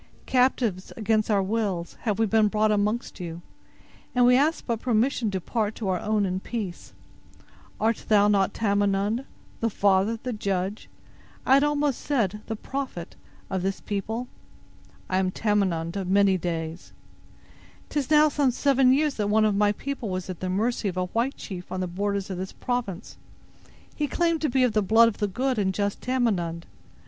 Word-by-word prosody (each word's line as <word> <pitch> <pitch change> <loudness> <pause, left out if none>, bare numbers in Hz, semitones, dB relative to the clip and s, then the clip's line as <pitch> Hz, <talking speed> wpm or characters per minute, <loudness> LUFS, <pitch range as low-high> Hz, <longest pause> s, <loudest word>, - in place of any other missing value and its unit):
"Captives 250 -7 +1
against 215 0 +1
our 200 -2 +3
wills, 195 -4 -2
have 210 -3 +1
we 225 - +3
been 220 0 +3
brought 215 +1 +2
amongst 210 +3 -1
you; 170 -1 -6 0.7
and 245 0 +5
we 250 0 +6
ask 300 +5 +2
but 230 -3 -1
permission 240 -1 +1
to 195 - -2
depart 215 +3 -2
to 215 - -4
our 180 -1 0
own 210 -1 +1
in 185 0 -1
peace. 200 -4 -6 0.9
Art 225 +1 0
thou 205 -1 +5
not 200 -1 +3
Tamenund—the 205 +3 -1
father, 200 +2 +2
the 250 - -2
judge, 195 -1 -3 0.6
I 260 - +4
had 275 +1 +6
almost 295 -2 +1
said, 210 -8 0
the 225 - -3
prophet—of 210 -6 -6
this 195 +1 -2
people?" 220 +4 -3 0.8
"I 185 - +1
am 190 -1 +1
Tamenund 185 -5 0
of 195 -2 -3
many 195 0 +4
days." 165 -2 -4 1.0
"'Tis 290 -3 -2
now 305 0 +6
some 285 -2 +2
seven 260 0 +3
years 295 +1 +2
that 205 -1 0
one 215 +1 +4
of 210 -2 +2
thy 205 0 +4
people 255 0 -5
was 185 0 -3
at 180 - -8
the 185 - -3
mercy 215 +4 0
of 185 -1 -3
a 185 - +1
white 235 +8 -1
chief 180 -2 -8
on 185 - -3
the 185 - -1
borders 200 +2 -2
of 180 - -4
this 190 0 -5
province. 230 -6 -4 0.8
He 295 - -1
claimed 335 +1 0
to 305 - +1
be 260 +1 +2
of 245 -3 +2
the 215 - +3
blood 225 +4 +5
of 215 - -9
the 205 - +1
good 250 +4 -1
and 190 -2 +1
just 200 +1 -2
Tamenund. 195 -10 -1
210 Hz, 175 wpm, -26 LUFS, 190-245 Hz, 1.0 s, we